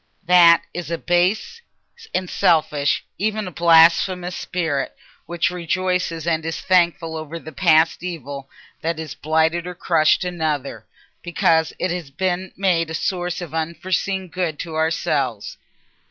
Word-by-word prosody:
That 175 -1 +6
is 175 -1 -5
a 170 - -2
base 185 - 0 0.5
and 185 - -2
selfish, 155 -5 +1
even 215 0 -1
a - - -6
blasphemous, 170 +2 +4
spirit 160 -7 -3 0.3
which 170 +1 0
rejoices 180 -1 -2
and 160 -2 0
is 165 0 -4
thankful 170 -3 +1
over 160 +1 -6
the 155 -1 -10
past 155 +3 +3
evil 145 -6 -6 0.3
that 165 0 -2
has 160 -2 -6
blighted 160 +3 0
or 180 - -6
crushed 165 -2 +2
another, 155 -6 -3 0.3
because 165 -2 +1
it 185 - -1
has 175 -5 -4
been 185 +5 -2
made 175 -4 +1
a 160 - -4
source 175 +1 -2
of 165 -3 -8
unforeseen 180 +4 -2
good 170 -2 -3
to 165 0 -6
ourselves. 150 -8 -1
170 Hz, 140 wpm, -21 LUFS, 160-180 Hz, 0.5 s, That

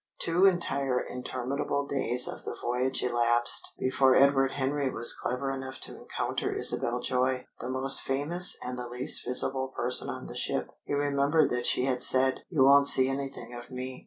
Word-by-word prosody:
Two 175 +3 +2
entire 140 -8 0
interminable 130 +3 -4
days 130 -3 +2
of - - -7
the - - -6
voyage 125 +2 -1
elapsed 120 -1 +1
before 130 0 +2
Edward 135 -1 +3
Henry 140 0 -1
was 120 -2 +5
clever 130 +2 -3
enough 130 0 -7
to - - -4
encounter - - -4
Isabel 120 +1 0
Joy 130 0 -1
the 120 - -6
most 130 +1 +1
famous 150 +7 -1
and 125 0 -6
the 125 - -5
least 125 +4 +2
visible 130 +1 -1
person 125 -1 0
on - - -7
the - - -9
ship. - - -3
He - - -4
remembered 145 +2 +1
that 125 0 -1
she 125 - +2
had 130 -2 -1
said: 130 +1 +2
"You 155 -7 +2
won't 140 +1 +6
see 130 -1 +5
anything 135 -3 -6
of 120 0 -10
me." 130 0 -7
130 Hz, 175 wpm, -28 LUFS, 125-140 Hz, -, won't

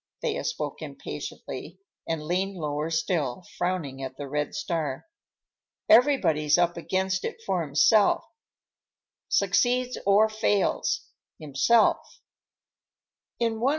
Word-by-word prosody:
Thea 465 -1 -1
spoke 475 - -4
impatiently - - -7 0.3
and 165 -2 -2
leaned 185 +5 -1
lower 150 -1 -2
still, 160 -2 -1
frowning 175 -7 -2
at 130 0 -6
the 145 - -6
red 150 +1 -2
star. 150 -2 -3 0.8
"Everybody's 175 - +4
up 175 0 +2
against 190 +2 -1
it - - -4
for 190 -3 0
himself, 155 +8 +3 1.0
succeeds 245 +6 +2
or 205 +2 +6
fails—himself." 205 - 0
175 Hz, 90 wpm, -26 LUFS, 150-200 Hz, 1.0 s, or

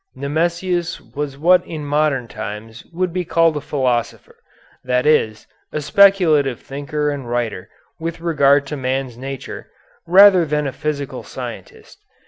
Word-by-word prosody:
Nemesius 170 +4 -1
was 145 -2 -6
what 175 +4 +4
in 155 -3 -7
modern 145 -4 0
times 110 +1 -8
would 180 0 -2
be 180 0 -1
called 165 -1 +2
a 150 - -3
philosopher, 125 -6 -2 0.5
that 125 0 0
is, 110 -8 +2 0.3
a - - -2
speculative 160 - +4
thinker 145 +2 -3
and 135 -4 -6
writer, 120 -6 -3 0.3
with 165 0 -4
regard 145 -4 +3
to 150 - -5
man's 130 -2 -2
nature, 135 +2 -7 0.4
rather 190 0 +7
than 150 -1 -1
a 135 - -3
physical 145 -2 -4
scientist. - - -9
145 Hz, 135 wpm, -19 LUFS, 130-165 Hz, 0.5 s, rather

